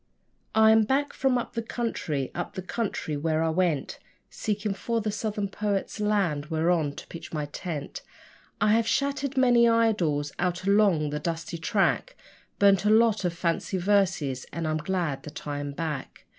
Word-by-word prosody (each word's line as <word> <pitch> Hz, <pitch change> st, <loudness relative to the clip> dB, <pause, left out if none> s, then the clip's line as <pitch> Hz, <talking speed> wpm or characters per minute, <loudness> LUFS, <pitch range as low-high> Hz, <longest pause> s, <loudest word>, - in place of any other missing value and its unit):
I 220 Hz, 0 st, +7 dB
am 220 Hz, 0 st, +6 dB
back 275 Hz, +6 st, 0 dB
from 265 Hz, -2 st, +1 dB
up 240 Hz, -, -4 dB
the 230 Hz, -, -2 dB
country, 220 Hz, -, -3 dB
up 175 Hz, +1 st, -5 dB
the 185 Hz, -, -4 dB
country 195 Hz, -7 st, -3 dB
where 155 Hz, +2 st, 0 dB
I 165 Hz, -, +1 dB
went 160 Hz, -4 st, 0 dB, 0.3 s
Seeking 210 Hz, -1 st, -2 dB
for 230 Hz, +4 st, -2 dB
the 215 Hz, -1 st, -2 dB
Southern 205 Hz, -1 st, -2 dB
poets' 200 Hz, +1 st, -2 dB
land 195 Hz, -9 st, 0 dB
whereon 160 Hz, -2 st, +1 dB
to -, -, -9 dB
pitch 170 Hz, -, -9 dB
my 150 Hz, -2 st, -2 dB
tent; 145 Hz, -1 st, -6 dB, 0.6 s
I 210 Hz, +1 st, +3 dB
have 225 Hz, 0 st, +2 dB
shattered 280 Hz, +1 st, 0 dB
many 240 Hz, -2 st, +5 dB
idols 180 Hz, -11 st, +2 dB
out 180 Hz, 0 st, -1 dB
along 195 Hz, -7 st, +3 dB
the 150 Hz, -, -2 dB
dusty 165 Hz, +1 st, -4 dB
track, 210 Hz, -, +1 dB, 0.4 s
Burnt 200 Hz, -2 st, +5 dB
a 210 Hz, -, +2 dB
lot 220 Hz, -1 st, +4 dB
of 175 Hz, -, 0 dB
fancy 175 Hz, +2 st, -1 dB
verses 180 Hz, -9 st, +1 dB
and 165 Hz, -1 st, -3 dB
I'm 155 Hz, 0 st, 0 dB
glad 165 Hz, -3 st, -2 dB
that 150 Hz, -, -9 dB
I 145 Hz, -1 st, -3 dB
am 145 Hz, 0 st, -4 dB
back. 150 Hz, -2 st, -5 dB
190 Hz, 170 wpm, -27 LUFS, 155-220 Hz, 0.6 s, I